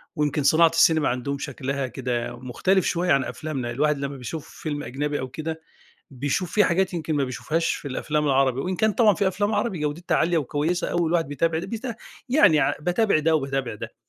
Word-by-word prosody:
ويمكن 150 -1 0
صناعة 160 +4 +5
السينما 160 -2 +4
عندهم 130 +3 -2
شكلها 135 -1 -3
كده 120 -1 -3
مختلف 185 +10 +1
شوية 175 +1 0
عن 135 -4 +4
أفلامنا، 135 -6 -4
الواحد 150 +4 +1
لمّا 140 0 -4
بيشوف 140 +5 -7
فيلم 145 -2 -5
أجنبي 145 +4 -3
أو 130 - -4
كده 160 +5 -5 0.5
بيشوف 145 +7 -2
في 210 - +4
حاجات 190 +1 +1
يمكن 160 -2 -2
ما 145 - +1
بيشوفهاش 155 +6 -1
في 145 - -6
الأفلام 150 +3 -1
العربي، 135 -2 +2
وإن 185 +4 -2
كان 220 +4 +2
طبعًا 215 -1 +4
في 195 +3 +1
أفلام 205 +3 0
عربي 195 -8 -1
جودتها 155 +3 -1
عالية 170 +1 +2
وكويسة 155 +4 -1
أوي 175 -1 +1
الواحد 165 -2 +1
بيتابع 160 +3 0
البيت 220 +7 -5 0.5
يعني 245 - +5
ع - - +2
باتابع 180 +2 +2
ده 160 +1 +2
وباتابع 135 -5 -2
ده. - - -8
150 Hz, 190 wpm, -24 LUFS, 135-170 Hz, 0.5 s, صناعة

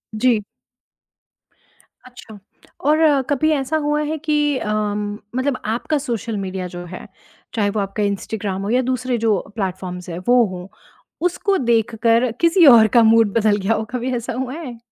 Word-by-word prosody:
जी। 235 0 +2 1.7
अच्छा, 240 -4 -13 0.5
और 300 -2 +4
कभी 300 +2 +2
ऐसा 300 +1 0
हुआ 295 0 0
है 310 +1 -3
कि 295 -2 0
अम, 210 -1 -2 0.2
मतलब 260 0 0
आपका 235 +8 -1
सोशल 235 -5 -3
मीडिया 190 -1 -4
जो 175 0 -8
है, 185 +1 -9 0.5
चाहे 205 -3 +1
वो 215 - -2
आपका 200 +1 -2
इंस्टाग्राम 200 -1 -3
हो 200 - -4
या 250 +2 +2
दूसरे 255 -1 -1
जो 220 -3 +2 0.2
प्लेटफ़ॉर्म्स 180 -3 -5
हैं, 170 +1 -5
वो 245 0 +5
हों, 180 -1 -8 0.6
उसको 390 +2 +1
देखकर 230 0 +1
किसी 335 +1 +5
और 220 -1 +6
का 235 - +7
मूड 225 -2 +4
बदल 215 -2 +3
गया 200 +3 0
हो, 220 - -1
कभी 250 +1 -2
ऐसा 235 -1 -4
हुआ 255 +1 -4
है? 280 -7 -7
230 Hz, 160 wpm, -20 LUFS, 205-265 Hz, 1.7 s, का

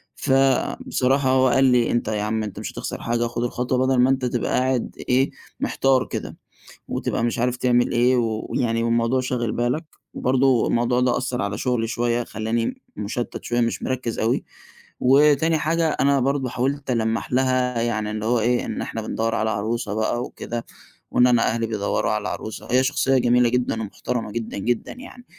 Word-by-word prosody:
فبصراحة 135 0 +1
هو 130 0 +4
قال 135 +2 +3
لي 125 -2 +3
أنت 120 -2 0
يا 105 -1 -1
عم 110 +1 -1
أنت 105 - -6
مش - - -5
هتخسر - - -5
حاجة، 120 0 0
خد 120 0 -3
الخطوة 125 +1 -1
بدل 130 -1 +2
ما 125 +1 +5
أنت 135 -1 +1
تبقى 120 -1 -1
قاعد 130 -1 -1
إيه 130 +2 +3 0.3
محتار 135 -1 +2
كده، - - -5 0.5
وتبقى 115 - -2
مش 120 -1 -1
عارف 125 +1 +1
تعمل 120 -1 +2
إيه، 125 +1 +3
ويعني 115 0 -1
والموضوع 115 +2 +1
شاغل 120 -3 -2
بالك، 125 +7 -1 0.3
برضه 130 -1 +2
الموضوع 120 +1 +1
ده 125 -1 +2
أثّر 125 0 -2
على 100 +1 -2
شغلي 120 -3 0
شويّة، 120 0 0
خلّاني 115 - -3
مشتّت 115 +4 -4
شويّة، 120 0 0
مش 115 - -1
مركّز 130 -3 -2
أوي 115 +2 +1 0.6
وتاني 150 +4 +4
حاجة، 165 +1 +1
أنا 140 -2 +2
برضه 135 0 0
حاولت 135 +2 -2
ألمَّح 115 0 -1
لها 130 -2 +1
يعني 110 -2 -1
اللي 110 0 -4
هو 120 0 +2
إيه، 120 +2 +1
إن - - -4
إحنا 115 - -4
بندوَّر 115 +1 -2
على 110 0 0
عروسة 110 +1 -2
بقى 110 +2 0
وكده، 120 -2 -6 0.5
وإن 125 - +5
أنا 120 -2 +3
أهلي 115 0 0
بيدوَّروا 105 -1 -1
على 105 0 -1
عروسة، 110 - -6
هي 130 +1 +4
شخصيّة 135 0 +2
جميلة 120 -1 +3
جدًا 120 -2 0
ومحترمة 110 +1 -4
جدًا، 115 -2 -4
جدًا 120 +4 -1
يعني، 250 0 -12
120 Hz, 175 wpm, -23 LUFS, 115-130 Hz, 0.6 s, ما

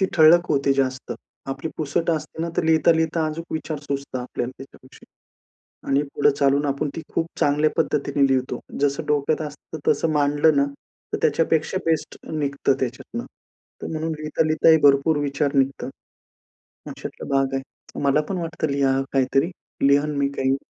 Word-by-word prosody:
ती 190 - +3
ठळक 170 +2 +6
होते 140 -1 +2
जास्त. 130 -1 -1 0.4
आपली 135 +4 -4
पुसट 165 +3 0
असते 160 0 -3
ना, 170 - -2
तर - - +2
लिहिता-लिहिता 160 0 +3
अजूक 160 +2 -4
विचार 155 -1 -3
सुचतात 140 -3 -4
आपल्याला 125 0 -4
त्याच्याविषयी. 135 -1 -15 0.8
आणि 140 +1 +3
पुढे - - +4
चालून 140 +1 +3
आपण 140 +1 -1
ती 165 - -4
खूप 165 - +1
चांगल्या 150 +2 +3
पद्धतीने 140 -1 +1
लिहतो. 130 -2 0 0.2
जसं 140 -1 0
डोक्यात 150 +1 +1
असतं 150 +2 -10
तसं 165 - +2
मांडलं 145 +1 +3
ना, 140 0 +4 0.5
तर - - +1
त्याच्यापेक्षा 160 +3 +1
बेस्ट 160 -2 -1
निघतं 140 -3 0
त्याच्यातनं. 130 - -4 0.6
तर - - -4
म्हणून 160 +1 -2
लिहिता-लिहिता 155 +1 +2
ही 160 - +8
भरपूर 145 +2 +5
विचार 140 0 -1
निघतात 135 0 +1 1.0
अशातला - - -8
भाग 135 0 +1
आहे. 135 0 -7
मला 140 +2 +3
पण 190 -2 -2
वाटतं 165 -1 -3
लिहा 135 -1 +2
काहीतरी. 135 +4 +2 0.4
लिहीन 145 +2 +3
मी 140 0 +1
काही. 135 0 +1
145 Hz, 155 wpm, -23 LUFS, 135-160 Hz, 1.0 s, ही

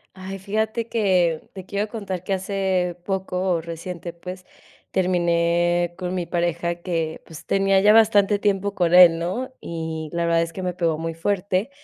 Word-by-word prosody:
Ay, 190 +1 -7
fíjate 220 +4 -2
que 180 -8 +1
te 190 -2 -9
quiero 200 +2 -2
contar 200 -5 -5
que 195 - -2
hace 190 -2 -1
poco 190 -1 -2
o 165 - 0
reciente, 170 +1 -6
pues, 180 +2 -9 0.5
terminé 175 -1 +1
con 180 0 -3
mi 180 -2 -2
pareja 170 0 -1
que, 165 -3 -2
pues, 160 -2 -11
tenía 195 0 +3
ya 205 +2 +6
bastante 210 -2 +4
tiempo 200 -1 0
con 175 -3 +1
él, 175 -2 +8
¿no? 215 +10 -3
Y 160 -1 -5
la 170 0 -1
verdad 170 0 +3
es 165 0 -2
que 190 - -6
me 180 -1 -1
pegó 165 -3 0
muy 165 +1 -3
fuerte. 190 +5 -1
180 Hz, 170 wpm, -23 LUFS, 170-195 Hz, 0.5 s, él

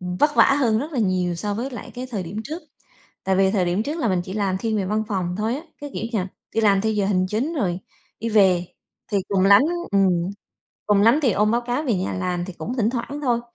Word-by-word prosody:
ừm, 180 0 -4
vất 295 +7 +2
vả - - +8 0.2
hơn 225 -4 +3
rất 300 +5 -4
là 260 - -2
nhiều 185 -4 +1
so 205 +4 -3
với 250 +5 -3
lại 240 - -8
cái 255 +1 -5
thời 205 -6 -3
điểm 185 +5 -5
trước. 320 +5 -6 0.6
Tại 190 - +1
vì 190 0 +3
thời 185 -4 +1
điểm 180 +5 0
trước 295 +6 -3
là 240 - +1
mình 185 -3 +1
chỉ 190 - -7
làm 195 -3 0
thiên 220 +2 -1
về 195 - -1
văn 215 +3 0
phòng 185 -4 -2
thôi 220 +3 0
á, 290 - -5 0.2
cái, 290 - -5
kiểu - - -4
như 220 - +2
là, 185 - -3 0.3
đi 225 - +1
làm 200 -2 +4
theo 220 - +1
giờ 205 -2 +1
hành 185 -2 +1
chính 240 - -1
rồi 190 - -1 0.4
đi 230 +1 -2
về, 190 -4 +4 0.5
thì 205 - +2
cùng 195 -1 +2
lắm 200 +1 +8 0.3
ừm, 195 -1 +4 0.8
cùng 205 -1 +4
lắm 230 +7 +5
thì 250 -6 +3
ôm 210 +2 +2
báo 235 +2 +2
cáo 245 +4 -2
về 255 -8 0
nhà 185 0 -2
làm 180 -1 -2
thì 190 - -7
cũng 240 +8 -5
thỉnh 225 -1 +2
thoảng 255 +4 -4
thôi. 240 -4 +1
210 Hz, 265 wpm, -23 LUFS, 190-235 Hz, 0.8 s, vả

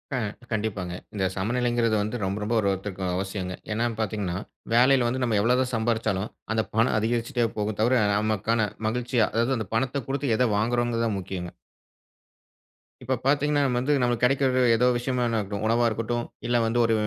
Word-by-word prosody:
அ - - 0 0.3
கண்டிப்பாங்க. 105 -5 -2 0.2
இந்த 100 -2 -2
சமநிலைங்கிறது 120 +2 +1
வந்து 110 +4 -3
ரொம்ப 95 +1 -1
ரொம்ப 110 +3 -1
ஒரு 100 - +1
ஒருத்தருக்கு 95 0 -4
அவசியங்க, 95 -1 -3 0.2
ஏனா 115 +3 0
பார்த்தீங்கனா, 100 -4 -2 0.4
வேலையில 125 +1 +5
வந்து 130 +2 -1
நம்ம 115 -3 +1
எவ்வளவு 125 +3 +3
சம்பாரிச்சாலும் 110 -3 0 0.2
அந்த 110 0 +2
பணம் 115 +1 +3
அதிகரிச்சிட்டே 115 +2 0
போகும் 105 0 -2
தவிர, 120 +1 +3
நமக்கான 110 +1 +1 0.2
மகிழ்ச்சியா 120 0 +1
அதாவது 120 +4 +1
அந்த 110 -5 -4
பணத்தை 130 +4 0
கொடுத்து 135 -2 0
எதை 125 - +3
வாங்குகிறோம்கிறது 115 +1 +1
தான் 105 -3 -1
முக்கியங்க. 90 -2 -6 1.5
இப்போ 130 - 0
பார்த்தீங்கன்னா 145 +1 +2
வந்து 130 +4 +1
நமக்கு 120 -1 0
கெடைக்கிறது 130 0 +3 0.2
ஏதோ 125 +2 +2
ஒரு 125 - +1
விஷயமா 125 0 -1
இருக்கட்டும், 105 -3 -2
உணவா 115 +2 +3
இருக்கட்டும், 115 +2 -2 0.2
இல்லை 120 0 +2
வந்து 115 +2 +1
ஒரு 115 - +2
115 Hz, 160 wpm, -26 LUFS, 105-125 Hz, 1.5 s, வேலையில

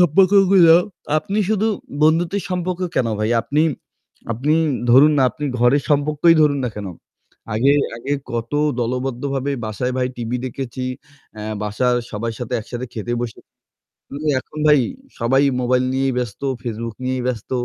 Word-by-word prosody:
সম্পর্কগুলা 185 0 +6 0.4
আপনি 205 +5 -3
শুধু 220 0 +1 0.4
বন্ধুত্বের 165 +5 +2
সম্পর্ক 180 0 -2 0.2
কেন 120 - +2
ভাই? 110 +1 0
আপনি 150 +5 0 0.7
আপনি 135 +7 0 0.4
ধরুন 145 +5 +7
না - - +4
আপনি 150 - -7
ঘরের 125 +4 +3
সম্পর্কই 150 +3 +3
ধরুন 145 -2 +2
না 125 - 0
কেন? 105 - -5 0.7
আগে 130 +6 +4 0.2
আগে 135 +5 -4 0.2
কত 115 +1 -4 0.3
দলবদ্ধভাবে 130 +3 -2
বাসায় 110 +4 -2
ভাই 125 -1 +1
টিভি 120 0 -3
দেখেছি। 130 0 -5 0.5
অ্যা 105 - -7 0.2
বাসার 120 +4 +1
সবার 115 +2 -3
সাথে 125 0 -6
একসাথে 120 +3 -6
খেতে 120 +2 -4
বসেছি। 120 -2 -5 1.0
এখন 155 - -12
ভাই 150 - +6 0.4
সবাই 135 +4 +3 0.2
মোবাইল 125 +1 +2
নিয়েই 135 0 0
ব্যস্ত। 120 -5 -4 0.2
Facebook 115 -1 -5
নিয়েই 130 0 -1
ব্যস্ত। 120 -5 -3
130 Hz, 140 wpm, -20 LUFS, 120-150 Hz, 1.0 s, ধরুন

